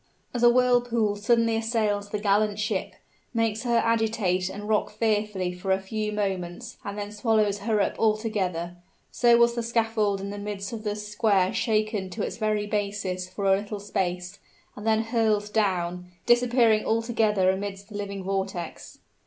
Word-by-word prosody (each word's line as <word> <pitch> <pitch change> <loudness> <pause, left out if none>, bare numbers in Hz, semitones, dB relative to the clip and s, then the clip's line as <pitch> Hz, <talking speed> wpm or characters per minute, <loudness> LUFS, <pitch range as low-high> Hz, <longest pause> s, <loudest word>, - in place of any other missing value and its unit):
As 245 - -2
a 240 - +7
whirlpool 240 -3 +2
suddenly 230 +2 +2
assails 220 -3 0
the 210 - -2
gallant 205 0 +2
ship, 215 0 -2 0.4
makes 225 -1 +1
her 240 -1 +1
agitate 220 -5 +1
and 205 +2 -7
rock 215 -1 +1
fearfully 210 -4 -1
for 180 +2 -3
a 190 - +3
few 210 +2 -3
moments 200 +2 -3
and 200 0 -5
then 205 0 -4
swallows 210 -1 +1
her 215 +1 0
up - - -1
altogether, 200 -6 0 0.3
so 235 -1 +5
was 235 0 +4
the 235 - -2
scaffold 225 -3 0
in 200 +1 -5
the 205 - -6
midst 205 0 -5
of 220 -2 -6
the 210 -1 -2
square 210 -2 +1
shaken 215 -4 0
to 205 +3 -4
its - - -4
very 215 -2 0
basis 200 -3 -2
for 195 +2 -4
a 195 0 +5
little 205 +1 -5
space, 180 -1 -3 0.4
and 210 +1 -7
then 220 0 +3
hurled 220 -3 0
down, 180 -4 0 0.2
disappearing 240 -2 +4
altogether 220 -4 +2
amidst 195 +1 -5
the 210 - -10
living 200 -1 -4
vortex. 190 -3 -4
210 Hz, 165 wpm, -26 LUFS, 195-225 Hz, 0.4 s, a